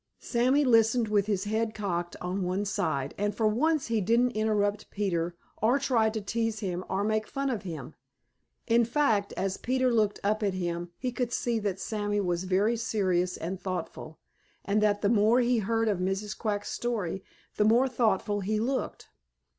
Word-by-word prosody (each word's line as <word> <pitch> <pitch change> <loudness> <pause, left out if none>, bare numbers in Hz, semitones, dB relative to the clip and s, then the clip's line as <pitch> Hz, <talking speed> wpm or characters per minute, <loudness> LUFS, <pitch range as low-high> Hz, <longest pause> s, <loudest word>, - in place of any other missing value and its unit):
Sammy 260 +4 +2
listened 225 -1 +4
with 205 -1 +2
his 200 -3 0
head 220 +1 -1
cocked 175 -4 -3
on 180 +2 -3
one 185 +3 -1
side, 145 -8 -1
and 205 0 0
for 220 - 0
once 290 +7 +1
he 225 -2 0
didn't 235 +5 +3
interrupt 210 -2 0
Peter 175 -4 -1 0.3
or 235 +5 +4
try 245 -5 +2
to 220 0 -3
tease 225 +1 -2
him 180 -3 -3
or 190 +1 0
make 215 0 0
fun 275 0 -2
of 230 - -2
him. 160 -6 -7 0.7
In 235 0 +4
fact, 230 -5 +1
as 190 0 -2
Peter 255 0 +1
looked 215 -3 +1
up 215 +2 +1
at 200 -3 0
him, 175 -1 -3
he 250 -1 -2
could 245 -1 -2
see 240 -1 0
that 200 -3 -2
Sammy 205 -1 -2
was 175 -2 -1
very 200 +5 +2
serious 185 -5 0
and 185 +3 -5
thoughtful, 175 -4 -5 0.5
and 205 +1 +1
that 205 -1 +2
the - - +4
more 220 +2 +4
he 245 -1 +2
heard 225 +2 0
of 200 -4 +1
Mrs. 195 +3 -2
Quack's 205 -2 -2
story 200 -6 -2 0.3
the - - +4
more 235 +5 +4
thoughtful 215 -4 +1
he 210 +2 -1
looked. 260 +4 -2
210 Hz, 180 wpm, -28 LUFS, 190-230 Hz, 0.7 s, listened